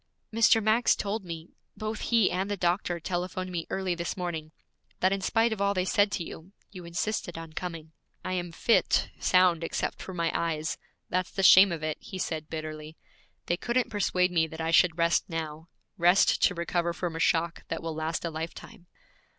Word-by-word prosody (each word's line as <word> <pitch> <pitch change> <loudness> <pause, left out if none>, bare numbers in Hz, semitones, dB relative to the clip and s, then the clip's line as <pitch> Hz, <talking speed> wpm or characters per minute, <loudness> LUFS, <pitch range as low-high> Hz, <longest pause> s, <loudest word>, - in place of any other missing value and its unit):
'Mr. 225 -1 +5
Max 220 +3 +4
told 205 +1 -3
me 165 -1 -7 0.3
both 215 0 -4
he 230 -4 +4
and 190 +3 -1
the 205 - -2
doctor 175 0 0
telephoned 185 +1 -3
me 170 -2 -4
early 190 -2 -1
this 170 +2 -4
morning 165 -4 -4 0.5
that 185 +1 +3
in 195 - -2
spite 225 +3 +2
of 205 - -5
all 200 0 +2
they 185 0 +1
said 205 +2 +2
to 175 - -2
you, 165 +3 -10 0.2
you 180 -3 -9
insisted 175 0 -3
on 165 -1 -8
coming.' 165 -2 -6 0.3
'I 185 - -2
am 175 -1 -3
fit, 230 +7 +2
sound 180 -3 +3
except 165 - -3
for 190 - -7
my 170 -1 0
eyes; 155 -2 -2 0.3
that's 185 0 0
the 195 - -3
shame 190 +1 +8
of 165 -2 -4
it,' 155 -1 -2
he 190 - -8
said 160 -4 -3
bitterly. 155 0 -6 0.5
'They 175 - 0
couldn't 240 +5 0
persuade 185 -3 +1
me 165 -2 +2
that 160 0 -10
I 165 0 -1
should 170 0 +4
rest 170 +2 +2
now, 160 0 -5 0.3
rest 175 +3 +4
to 180 - +1
recover 170 0 -1
from 170 0 -4
a - - -4
shock 170 0 +1
that - - -4
will 165 -1 -3
last 160 +2 -3
a 170 - -2
lifetime.' 165 +2 -8
175 Hz, 195 wpm, -28 LUFS, 165-190 Hz, 0.5 s, shame